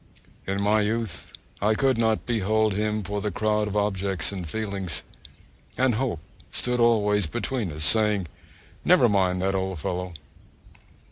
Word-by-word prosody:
In 100 +1 -1
my 105 +1 +3
youth 110 -3 -2 0.3
I 110 +2 +3
could 135 +2 +2
not 110 -1 +1
behold 110 -2 +1
him 105 +1 -1
for 100 +2 -3
the 105 - -1
crowd 105 +2 0
of 105 0 -2
objects 95 -3 0
and 90 -5 -5
feelings, 100 -4 -3 0.7
and 130 -1 +3
Hope 110 -8 -1 0.3
stood 125 0 -1
always 105 -5 +3
between 120 - -2
us, 75 +1 -3
saying, 105 -2 +3 0.6
'Never 120 - +5
mind 95 -3 +1
that 95 0 +1
old 95 -1 -2
fellow!' 90 +3 -3
105 Hz, 145 wpm, -25 LUFS, 95-110 Hz, 0.7 s, Never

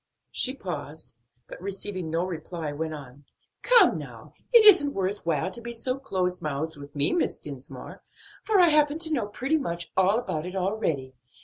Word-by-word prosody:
She 260 +1 -1
paused, 155 - -7 0.3
but - - -10
receiving 190 -2 -4
no 165 +3 0
reply, 165 -3 -5
went 155 +2 -4
on. 140 -1 -12 0.4
"Come - - +5
now, - - -11 0.2
it 470 -3 +7
isn't 360 -9 +7
worth 195 -1 -2
while 165 +3 0
to 235 - -8
be 235 0 -6
so 255 +3 -3
close 185 -8 -2
mouthed 155 +2 -3
with 145 0 -12
me, 145 0 +3
Miss 350 - 0
Dinsmore; - - -9 0.4
for 425 -3 +3
I 350 -2 +7
happen 300 -1 +3
to 320 -1 -2
know 235 -8 0
pretty 265 +9 0
much 170 -10 -4
all 190 +3 +4
about 175 -9 -3
it 185 - -7
already. 180 -9 -1
185 Hz, 180 wpm, -26 LUFS, 160-260 Hz, 0.4 s, it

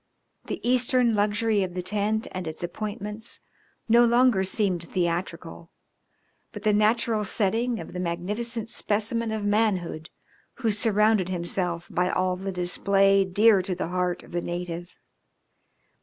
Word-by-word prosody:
The - - -5
Eastern 250 -1 +3
luxury 210 +1 +1
of 180 -2 -3
the 180 - -3
tent 210 +3 -1
and 185 -2 -5
its 160 +3 -6
appointments 210 +3 -5 0.5
no 235 +1 +6
longer 240 -4 +4
seemed 185 -3 0
theatrical, 170 -1 -3 0.8
but 210 -3 -9
the 215 -1 +3
natural 215 +1 +2
setting 225 +4 0
of - - -9
the 180 - -4
magnificent 210 +7 -3
specimen 225 +1 -1
of 215 -2 -3
manhood 200 -7 0 0.5
who 230 -5 0
surrounded 210 -2 +2
himself 175 -1 -2
by 180 0 +1
all 185 0 0
the 195 +1 -4
display 195 +2 +2
dear 200 +2 +4
to 185 0 -3
the 170 - -3
heart 180 0 -1
of - - -16
the 175 - -2
native. 175 0 -5
200 Hz, 140 wpm, -26 LUFS, 180-220 Hz, 0.8 s, no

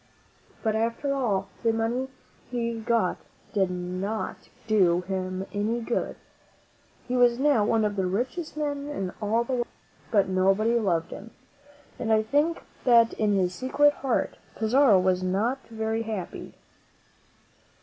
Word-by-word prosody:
But 220 -1 +1
after 230 +5 0
all, 200 -8 0
the 230 - +3
money 230 +4 -1 0.4
he 235 -2 -2
got 230 +1 +1 0.4
did 195 -3 +2
not 180 +4 -4 0.2
do 185 -5 +3
him 185 0 -3
any 215 +4 0
good. 235 +1 -2 0.9
He 250 - -1
was 245 -1 +4
now 275 -5 +3
one 220 +1 +2
of 205 -1 -1
the 190 -2 0
richest 255 - -3
men 285 -1 -2
in 195 -11 -3
all 220 +3 +1
the 260 - -4
world. 240 -1 0 0.4
But 200 -3 +3
nobody 195 +5 +2
loved 170 -6 0
him, 225 - -8 0.7
and 225 - -1
I 220 0 +4
think 295 +8 +1 0.2
that 235 -2 +5
in 210 -2 +1
his 185 -2 +1
secret 290 +7 +3
heart 265 -4 -1 0.2
Pizarro 220 -2 +4
was 185 0 +2
not 205 +8 0
very 220 0 -2
happy. 215 -5 -6
225 Hz, 140 wpm, -26 LUFS, 195-245 Hz, 0.9 s, that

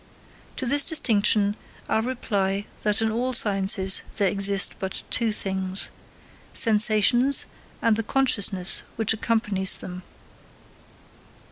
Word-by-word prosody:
To 260 - -3
this 285 +3 +4
distinction, 210 -8 +2 0.3
I - - 0
reply 205 -5 -3 0.2
that 210 +1 +1
in 220 - -1
all 250 +3 -3
sciences 195 -3 +2 0.2
there 200 -3 +1
exist 200 0 +1
but 190 -1 -4
two 230 -2 0
things: 190 -2 -1 0.6
sensations 225 +4 +3 0.4
and 230 -1 +2
the 225 - -2
consciousness 205 -7 0
which 220 -1 0
accompanies 210 -4 0
them. 180 0 -9
210 Hz, 110 wpm, -23 LUFS, 195-230 Hz, 0.6 s, this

